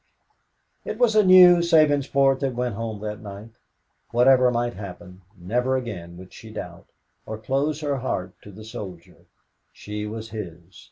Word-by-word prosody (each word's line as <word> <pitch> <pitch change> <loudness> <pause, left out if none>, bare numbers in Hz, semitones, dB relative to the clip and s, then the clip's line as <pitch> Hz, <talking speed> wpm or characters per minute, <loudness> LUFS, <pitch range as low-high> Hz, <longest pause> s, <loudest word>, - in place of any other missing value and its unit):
It 215 - -5
was 235 -2 +3
a 215 - +6
new 185 -2 +8
Sabinsport 145 -5 +3
that 135 -3 -2
went 125 -1 -2
home 110 -1 -5
that 105 -1 -5
night. 105 +2 -10 0.6
Whatever 125 +1 +5
might 120 0 -1
happen, 90 -2 -10 0.2
never 125 +9 -1
again 90 -9 -7
would 95 0 -13
she 110 - -12
doubt, 90 -5 -9 0.4
or 110 - -5
close 140 +7 -1
her 145 -2 -1
heart 95 -8 -3
to 105 - -12
the 105 +3 -12
soldier. 95 -6 -10 0.4
She 105 0 -6
was 110 +1 -7
his. 85 -5 -9
115 Hz, 155 wpm, -24 LUFS, 100-135 Hz, 0.6 s, new